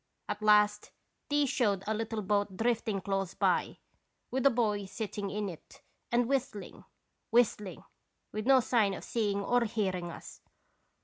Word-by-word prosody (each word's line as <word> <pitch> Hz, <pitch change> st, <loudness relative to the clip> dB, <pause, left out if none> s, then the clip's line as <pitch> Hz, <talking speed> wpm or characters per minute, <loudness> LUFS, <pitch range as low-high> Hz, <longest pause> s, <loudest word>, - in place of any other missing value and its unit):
At 210 Hz, -, -4 dB
last 210 Hz, 0 st, +4 dB, 0.4 s
these 290 Hz, -1 st, +2 dB
showed 210 Hz, -8 st, +1 dB
a 220 Hz, -, 0 dB
little 225 Hz, 0 st, -3 dB
boat 200 Hz, -1 st, 0 dB
drifting 225 Hz, -3 st, 0 dB
close 195 Hz, -1 st, -2 dB
by, -, -, +1 dB, 0.5 s
with 265 Hz, +1 st, +3 dB
a -, -, +7 dB
boy 215 Hz, -5 st, 0 dB
sitting 205 Hz, 0 st, -4 dB
in 205 Hz, +1 st, -2 dB
it 170 Hz, -5 st, -11 dB, 0.3 s
and 240 Hz, 0 st, +2 dB
whistling, 260 Hz, -6 st, -3 dB, 0.4 s
whistling, 225 Hz, -5 st, +1 dB, 0.5 s
with 215 Hz, +2 st, -4 dB
no 265 Hz, -1 st, +7 dB
sign 220 Hz, -5 st, +2 dB
of -, -, -9 dB
seeing 205 Hz, -3 st, -1 dB
or 245 Hz, +2 st, +2 dB
hearing 190 Hz, -6 st, -2 dB
us. -, -, -10 dB
210 Hz, 145 wpm, -31 LUFS, 200-235 Hz, 0.5 s, a